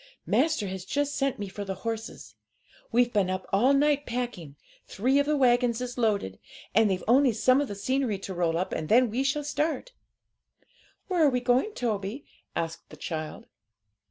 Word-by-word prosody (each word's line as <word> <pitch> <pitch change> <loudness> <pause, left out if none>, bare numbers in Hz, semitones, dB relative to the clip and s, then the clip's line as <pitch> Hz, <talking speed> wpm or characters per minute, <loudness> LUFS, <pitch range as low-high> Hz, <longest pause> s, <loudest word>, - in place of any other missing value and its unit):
Master 315 -10 +2
has 190 -1 -5
just 290 +7 -1
sent 275 -1 0
me 205 - -4
for 200 +2 -6
the 195 -1 -4
horses; 225 -1 -5 0.6
we've 240 0 +3
been 200 -4 +2
up 185 0 -3
all 235 +8 +4
night 290 +1 +2
packing; 235 - -4 0.3
three 260 +7 +1
of 285 - +1
the 300 0 +2
waggons 245 -2 +3
is 245 0 -4
loaded, 205 - 0 0.3
and 220 +1 +4
they've 185 -1 -1
only 255 +1 +5
some 255 +5 +3
of 290 - -2
the 205 - -6
scenery 255 +1 0
to 190 0 -6
roll 170 -2 0
up, 185 - -2
and 155 -1 -3
then 240 0 +5
we 255 +4 0
shall 295 +2 0
start.' 310 +11 -2 1.2
'Where 360 -4 +2
are 295 - +6
we 250 -2 0
going, 250 - +1
Toby?' 220 +2 -3 0.3
asked 165 0 -4
the - - -12
child. 155 -2 -5
240 Hz, 185 wpm, -27 LUFS, 195-275 Hz, 1.2 s, are